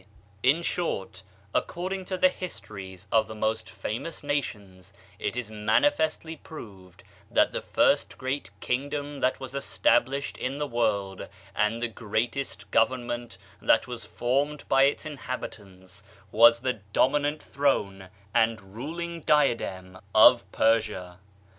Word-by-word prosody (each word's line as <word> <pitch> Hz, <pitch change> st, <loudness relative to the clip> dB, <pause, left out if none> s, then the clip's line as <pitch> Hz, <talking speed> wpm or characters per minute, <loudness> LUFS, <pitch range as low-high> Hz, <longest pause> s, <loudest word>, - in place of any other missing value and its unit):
In 145 Hz, +8 st, +3 dB
short, 95 Hz, -, -2 dB, 0.3 s
according 185 Hz, +2 st, -2 dB
to 185 Hz, 0 st, -3 dB
the 185 Hz, 0 st, +5 dB
histories 100 Hz, -, -8 dB
of 110 Hz, -1 st, +4 dB
the 110 Hz, -, -8 dB
most 110 Hz, +1 st, -1 dB
famous 115 Hz, +9 st, -5 dB
nations, 100 Hz, -10 st, -4 dB, 0.3 s
it -, -, -2 dB
is 120 Hz, -3 st, -4 dB
manifestly 160 Hz, -, +1 dB
proved 95 Hz, -, -12 dB, 0.3 s
that -, -, +3 dB
the -, -, -3 dB
first -, -, +2 dB
great 130 Hz, +2 st, -3 dB
kingdom 145 Hz, +2 st, -2 dB
that 130 Hz, -1 st, +1 dB
was 130 Hz, -1 st, -7 dB
established 140 Hz, 0 st, +1 dB
in 130 Hz, +2 st, -2 dB
the 150 Hz, -, -1 dB
world, 105 Hz, -7 st, -1 dB, 0.3 s
and 110 Hz, +3 st, +1 dB
the -, -, +2 dB
greatest 110 Hz, -2 st, -3 dB
government 120 Hz, -2 st, 0 dB, 0.2 s
that 115 Hz, -, +4 dB
was 120 Hz, -2 st, -6 dB
formed 140 Hz, +4 st, -1 dB
by 135 Hz, 0 st, +5 dB
its 140 Hz, +3 st, 0 dB
inhabitants, 100 Hz, -10 st, -7 dB, 0.3 s
was 115 Hz, +1 st, +7 dB
the 130 Hz, 0 st, +1 dB, 0.2 s
dominant 145 Hz, +2 st, +2 dB
throne 100 Hz, -9 st, 0 dB, 0.2 s
and 110 Hz, -4 st, +1 dB
ruling 170 Hz, +8 st, -5 dB
diadem 100 Hz, -12 st, +1 dB, 0.2 s
of 120 Hz, +2 st, +7 dB
Persia. 105 Hz, -6 st, +1 dB
120 Hz, 125 wpm, -27 LUFS, 105-145 Hz, 0.3 s, was